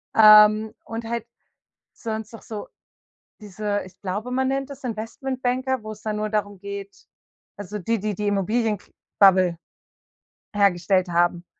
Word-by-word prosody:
Ähm, 215 Hz, 0 st, +7 dB
und 225 Hz, 0 st, -6 dB
halt 235 Hz, -1 st, -3 dB, 0.7 s
sonst 220 Hz, -1 st, -5 dB
noch 225 Hz, -, -11 dB
so 215 Hz, -2 st, -7 dB, 0.7 s
diese 205 Hz, 0 st, -3 dB
ich 185 Hz, -, -15 dB
glaube, 205 Hz, +6 st, -4 dB
man 260 Hz, +1 st, +1 dB
nennt 270 Hz, 0 st, -1 dB
das 280 Hz, 0 st, -10 dB
Investmentbanker, 255 Hz, +2 st, -2 dB
wo 215 Hz, -, -5 dB
es 210 Hz, -, -13 dB
dann 215 Hz, -1 st, -2 dB
nur 215 Hz, 0 st, -1 dB
darum 205 Hz, -2 st, -2 dB
geht 200 Hz, 0 st, -8 dB, 0.5 s
also 205 Hz, +1 st, -6 dB
die, 225 Hz, +3 st, -1 dB
die 210 Hz, +1 st, -2 dB
die 210 Hz, -, -2 dB
Immobilien 210 Hz, +2 st, 0 dB
kr -, -, -24 dB, 0.3 s
Bubble 185 Hz, -3 st, +5 dB, 1.0 s
hergestellt 190 Hz, -1 st, +3 dB
haben, 175 Hz, 0 st, +1 dB
210 Hz, 145 wpm, -24 LUFS, 200-225 Hz, 1.0 s, Ähm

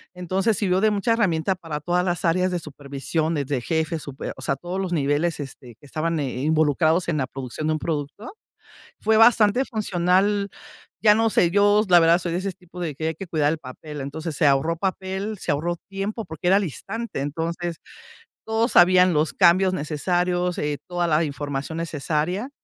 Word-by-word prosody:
Entonces, 185 Hz, +4 st, 0 dB
sirvió 185 Hz, -2 st, +1 dB
de 215 Hz, -, +4 dB
mucha 210 Hz, +3 st, +1 dB
herramienta 190 Hz, -5 st, +1 dB
para 165 Hz, -5 st, -6 dB
todas 175 Hz, +4 st, 0 dB
las 175 Hz, -2 st, -1 dB
áreas 185 Hz, +2 st, +2 dB
de 180 Hz, -, 0 dB
supervisiones, 145 Hz, +1 st, -3 dB
de 135 Hz, -4 st, -1 dB
jefes, 160 Hz, +2 st, -1 dB
súper, 140 Hz, -1 st, -6 dB
o -, -, -10 dB
sea, 135 Hz, -, 0 dB
todos 175 Hz, +6 st, -5 dB
los 185 Hz, -2 st, -3 dB
niveles 150 Hz, +2 st, 0 dB
este, 130 Hz, -4 st, -9 dB
que -, -, -18 dB
estaban 160 Hz, +3 st, -2 dB
eh, 135 Hz, -4 st, -3 dB
involucrados 155 Hz, +2 st, +2 dB
en 160 Hz, -, 0 dB
la 130 Hz, -3 st, -1 dB
producción 135 Hz, +3 st, -5 dB
de 155 Hz, -, +2 dB
un 155 Hz, -, -2 dB
producto, 155 Hz, -, -4 dB, 0.7 s
fue 220 Hz, +1 st, +2 dB
bastante 225 Hz, +1 st, +5 dB
funcional, 200 Hz, -2 st, +1 dB, 0.5 s
ya 210 Hz, -1 st, +7 dB
no 225 Hz, +1 st, +2 dB
sé, 175 Hz, -5 st, +3 dB
yo, 205 Hz, +2 st, +4 dB
la 175 Hz, -1 st, +8 dB
verdad 165 Hz, +1 st, +5 dB
soy 175 Hz, -1 st, -4 dB
de 175 Hz, -, -1 dB
ese 195 Hz, +1 st, -3 dB
tipo 180 Hz, -1 st, -14 dB
de 165 Hz, -5 st, -3 dB
que 160 Hz, +3 st, -2 dB
hay -, -, -3 dB
que 190 Hz, +4 st, -8 dB
cuidar 150 Hz, -3 st, +1 dB
el 160 Hz, -, -3 dB
papel. 145 Hz, +2 st, -9 dB
Entonces 155 Hz, +3 st, -5 dB
se 145 Hz, -, +3 dB
ahorró 140 Hz, +4 st, +2 dB
papel, 190 Hz, +3 st, -3 dB
se 175 Hz, -, -2 dB
ahorró 165 Hz, +4 st, -1 dB
tiempo 200 Hz, +3 st, -4 dB
porque 160 Hz, 0 st, -5 dB
era 190 Hz, -, +5 dB
al 200 Hz, -, +3 dB
instante. 210 Hz, -, -5 dB
Entonces, 165 Hz, +4 st, -3 dB, 0.7 s
todos 225 Hz, +2 st, 0 dB
sabían 180 Hz, 0 st, +6 dB
los 155 Hz, +1 st, +1 dB
cambios 185 Hz, +1 st, +4 dB
necesarios, 175 Hz, +3 st, -1 dB
eh, 150 Hz, -1 st, -2 dB
toda 175 Hz, -1 st, -1 dB
la 160 Hz, 0 st, +2 dB
información 145 Hz, +1 st, -4 dB
necesaria. 165 Hz, -, -2 dB
170 Hz, 190 wpm, -23 LUFS, 150-190 Hz, 0.7 s, la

